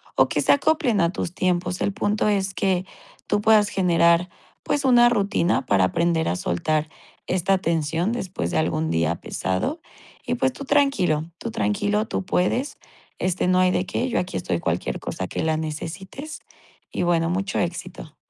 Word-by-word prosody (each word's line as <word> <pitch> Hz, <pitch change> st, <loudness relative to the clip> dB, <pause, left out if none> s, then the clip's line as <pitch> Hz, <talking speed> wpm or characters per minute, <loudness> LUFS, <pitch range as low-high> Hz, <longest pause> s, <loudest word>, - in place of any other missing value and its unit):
o -, -, +4 dB
que -, -, 0 dB
se -, -, +3 dB
acoplen 285 Hz, -, +2 dB
a 170 Hz, +1 st, +2 dB
tus 180 Hz, -2 st, -4 dB
tiempos. 180 Hz, 0 st, -1 dB
El -, -, +1 dB
punto 205 Hz, +1 st, 0 dB
es 195 Hz, -2 st, 0 dB
que 185 Hz, -1 st, 0 dB, 0.4 s
tú 205 Hz, -, +1 dB
puedas 210 Hz, -1 st, +4 dB
generar, 170 Hz, -1 st, +3 dB, 0.3 s
pues, 290 Hz, -1 st, -1 dB
una 240 Hz, -2 st, +6 dB
rutina 200 Hz, -5 st, +1 dB
para 95 Hz, -2 st, +3 dB
aprender 170 Hz, -, +1 dB
a 90 Hz, -, 0 dB
soltar 150 Hz, -, -1 dB, 0.4 s
esta 190 Hz, +1 st, +2 dB
tensión 165 Hz, +3 st, 0 dB
después 185 Hz, -, -3 dB
de 80 Hz, -, 0 dB
algún 80 Hz, 0 st, 0 dB
día 80 Hz, 0 st, +1 dB
pesado 95 Hz, -, -2 dB, 0.5 s
y 245 Hz, -, 0 dB
pues, 260 Hz, +1 st, +1 dB
tú 280 Hz, -, -8 dB
tranquilo, 265 Hz, -, +2 dB
tú 230 Hz, -, -5 dB
tranquilo, 210 Hz, 0 st, 0 dB
tú -, -, -2 dB
puedes, 240 Hz, +10 st, 0 dB, 0.4 s
este, 185 Hz, 0 st, 0 dB
no 185 Hz, 0 st, +3 dB
hay 185 Hz, 0 st, +4 dB
de 185 Hz, -, 0 dB
qué, 255 Hz, +6 st, -2 dB
yo -, -, -1 dB
aquí 180 Hz, -, -3 dB
estoy 85 Hz, -1 st, -2 dB
cualquier 85 Hz, +1 st, -2 dB
cosa 95 Hz, -, -4 dB
que -, -, -3 dB
la 160 Hz, -1 st, +1 dB
necesites 170 Hz, -, -6 dB, 0.5 s
y -, -, -2 dB
bueno, 170 Hz, -1 st, +2 dB
mucho 195 Hz, +3 st, -1 dB
éxito. 175 Hz, -2 st, -5 dB
180 Hz, 175 wpm, -23 LUFS, 160-210 Hz, 0.5 s, una